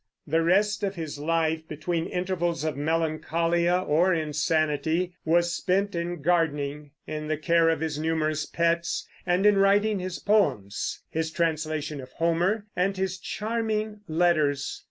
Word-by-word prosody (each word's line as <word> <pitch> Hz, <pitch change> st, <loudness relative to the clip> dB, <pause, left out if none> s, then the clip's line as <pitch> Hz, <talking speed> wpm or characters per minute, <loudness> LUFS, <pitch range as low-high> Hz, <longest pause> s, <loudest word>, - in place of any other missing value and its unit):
The 160 Hz, +2 st, +1 dB
rest 205 Hz, +6 st, +2 dB
of 200 Hz, -1 st, -1 dB
his 160 Hz, -4 st, -5 dB
life, 160 Hz, 0 st, 0 dB
between 165 Hz, +2 st, -2 dB
intervals 175 Hz, -3 st, -1 dB
of 155 Hz, -1 st, -1 dB
melancholia 165 Hz, +3 st, +1 dB
or 175 Hz, +5 st, +3 dB
insanity, 155 Hz, +2 st, 0 dB
was 170 Hz, +1 st, +3 dB
spent 195 Hz, +3 st, 0 dB
in 170 Hz, -2 st, -3 dB
gardening, 150 Hz, -3 st, 0 dB, 0.2 s
in 155 Hz, 0 st, -5 dB
the 155 Hz, 0 st, -1 dB
care 165 Hz, +1 st, +3 dB
of 160 Hz, -2 st, 0 dB
his 155 Hz, -2 st, -2 dB
numerous 155 Hz, -1 st, 0 dB
pets, 170 Hz, 0 st, 0 dB, 0.2 s
and 180 Hz, +2 st, +2 dB
in 210 Hz, -1 st, +6 dB
writing 205 Hz, +1 st, +3 dB
his 185 Hz, 0 st, -4 dB
poems, 140 Hz, -, 0 dB
his 160 Hz, 0 st, -1 dB
translation 155 Hz, -3 st, -2 dB
of 130 Hz, 0 st, -12 dB
Homer, 175 Hz, +6 st, +1 dB
and 190 Hz, +2 st, 0 dB
his 190 Hz, 0 st, -2 dB
charming 215 Hz, +1 st, -2 dB
letters. 155 Hz, -4 st, +1 dB
165 Hz, 140 wpm, -26 LUFS, 155-185 Hz, 0.2 s, in